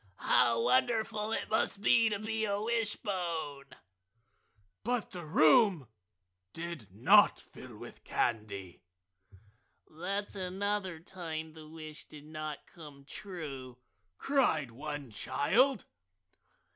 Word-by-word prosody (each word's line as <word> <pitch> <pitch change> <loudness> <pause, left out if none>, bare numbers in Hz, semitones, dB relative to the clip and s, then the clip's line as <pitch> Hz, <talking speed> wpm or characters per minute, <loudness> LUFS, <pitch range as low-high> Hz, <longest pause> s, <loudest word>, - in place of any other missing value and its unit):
"How 115 -1 +4
wonderful 215 - +2
it - - -1
must 215 -2 0
be 225 +2 +5
to 205 - -1
be 220 +1 -2
a 200 -1 0
wishbone!" 185 -10 -1 1.2
But 245 -1 -1
the 175 -1 -6
room 155 - +5 0.6
did 170 - -6
not 105 +6 +6
fill - - -12
with - - -11
candy. 100 -6 -2 1.0
"That's 195 +6 -4
another 190 -1 -2
time 160 -3 -6
the 155 -1 -12
wish 155 -1 -8
did 150 -1 -12
not 155 -1 -6
come 145 -5 -13
true!" 140 -9 -7 0.4
cried 200 - +2
one 145 +1 -6
child. 230 - +2
165 Hz, 105 wpm, -32 LUFS, 145-205 Hz, 1.2 s, not